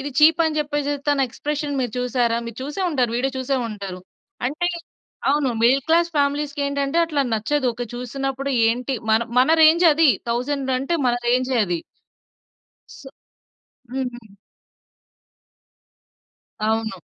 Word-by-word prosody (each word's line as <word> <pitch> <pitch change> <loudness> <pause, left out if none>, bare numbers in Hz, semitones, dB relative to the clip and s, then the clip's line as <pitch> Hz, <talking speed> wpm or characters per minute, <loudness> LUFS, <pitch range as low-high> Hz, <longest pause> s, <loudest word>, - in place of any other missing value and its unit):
ఇది 285 +2 -5
చీప్ 320 +2 +6
అని 310 -1 -1
చెప్పేసి 290 -1 -1 0.2
తన 275 -2 +2
ఎక్స్ప్రెషన్ 290 +2 -3
మీరు 245 -4 -2
చూసారా? 245 -2 +1
మీరు 230 0 -8
చూసే 295 +8 -4
ఉంటారు. 250 -6 +1
వీడియో 265 +2 -1
చూసే 260 +1 -1
ఉంటారు. 195 -4 -7 0.5
అంటే 350 +6 -1 0.6
అవును, 290 -2 +1
మిడిల్ 260 +3 +4
క్లాస్ 335 +1 +4
ఫ్యామిలీస్‌కి 285 0 0
ఏంటంటే 280 +2 -2
అట్లా 295 -3 0
నచ్చదు. 260 +5 0
ఒక 245 +1 -4
చూసినప్పుడు 270 +2 -3 0.2
ఏంటి 250 +3 -1 0.2
మన 220 +1 +4 0.2
మన 255 +4 +4
రేంజ్ 330 +3 +6
అది. 315 0 +4 0.2
1000 265 +3 -1
అంటే 305 +6 -1
మన 240 - +2
రేం‌జే 255 +1 +1
అది. 175 -1 -1 1.2
స్ - - -12 0.9
హ్మ్. 245 -5 -5 2.3
అవును. 220 -1 0
270 Hz, 130 wpm, -22 LUFS, 245-290 Hz, 2.3 s, చీప్